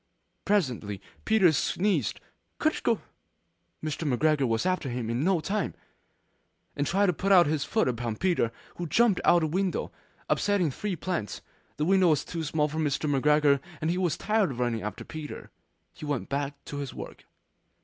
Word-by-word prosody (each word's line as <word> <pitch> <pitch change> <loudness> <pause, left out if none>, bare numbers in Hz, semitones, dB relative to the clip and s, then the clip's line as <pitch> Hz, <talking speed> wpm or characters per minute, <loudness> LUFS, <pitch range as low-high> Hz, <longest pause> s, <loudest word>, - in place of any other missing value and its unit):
Presently 125 - 0 0.3
Peter 215 -6 +5
sneezed 170 - 0 0.4
'Kertyschoo!' - - +1 0.8
Mr. 155 -1 -2
McGregor 145 +1 +2
was 115 -1 0
after 185 -7 0
him 120 -2 -3
in 120 +4 0
no 180 -1 +2
time. 200 +3 -2 1.0
And 145 0 -1
tried 200 +3 +3
to 180 - +2
put 185 0 +5
his 150 -1 0
foot - - +1
upon 120 -2 -2
Peter, 170 -7 +1 0.3
who 175 - -3
jumped 225 +2 +3
out 175 -1 +5
of 155 - 0
a - - -3
window, 190 -2 -1 0.4
upsetting 200 -7 +2
three 200 +7 -3
plants. 170 - -3 0.4
The 150 - 0
window 190 0 +4
was 150 -3 +2
too 170 - -4
small 150 0 +1
for 155 +2 -4
Mr. 150 0 0
McGregor, 145 0 +4 0.2
and 155 +2 0
he 180 - -1
was 175 -5 0
tired 215 -3 +1
of 125 -3 -6
running 120 -3 0
after 105 - -5
Peter. 155 -2 -8 0.4
He - - -9
went 145 -4 -2
back 140 0 -2
to 145 - -6
his 140 -3 -5
work. - - -9
155 Hz, 170 wpm, -28 LUFS, 135-185 Hz, 1.0 s, Peter